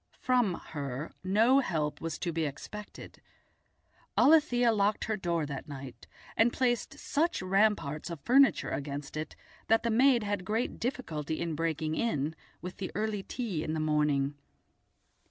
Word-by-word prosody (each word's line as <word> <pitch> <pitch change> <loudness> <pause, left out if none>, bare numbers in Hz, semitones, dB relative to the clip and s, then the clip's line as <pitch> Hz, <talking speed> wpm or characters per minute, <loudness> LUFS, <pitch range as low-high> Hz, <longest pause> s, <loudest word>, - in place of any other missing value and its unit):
From 245 -8 +2 0.2
her 140 0 -4
no 225 +8 +4
help 155 - -1
was 165 -2 -3
to 175 - -2
be 165 0 -1
expected. 205 +9 -8 1.0
Alethia 245 -7 +5
locked 205 +1 +1
her 220 - -1
door 170 -5 -1
that 140 -2 -6
night, 135 -3 -9 0.3
and 230 +2 +4
placed 240 -2 0
such 330 +4 0
ramparts 185 -6 +1
of 170 -3 -6
furniture 270 - +4
against 145 0 -4
it 155 +1 -5 0.3
that 225 +1 +4
the 235 - +1
maid 245 0 +4
had 205 -2 -2
great 220 +6 -2
difficulty 160 - -3
in 165 -1 -2
breaking 155 0 -1
in 160 -6 -1 0.3
with 180 0 -6
the 190 - -4
early 215 -1 -1
tea 195 -7 -3
in 155 - -2
the - - -1
morning. 150 -2 +1
185 Hz, 150 wpm, -30 LUFS, 150-230 Hz, 1.0 s, Alethia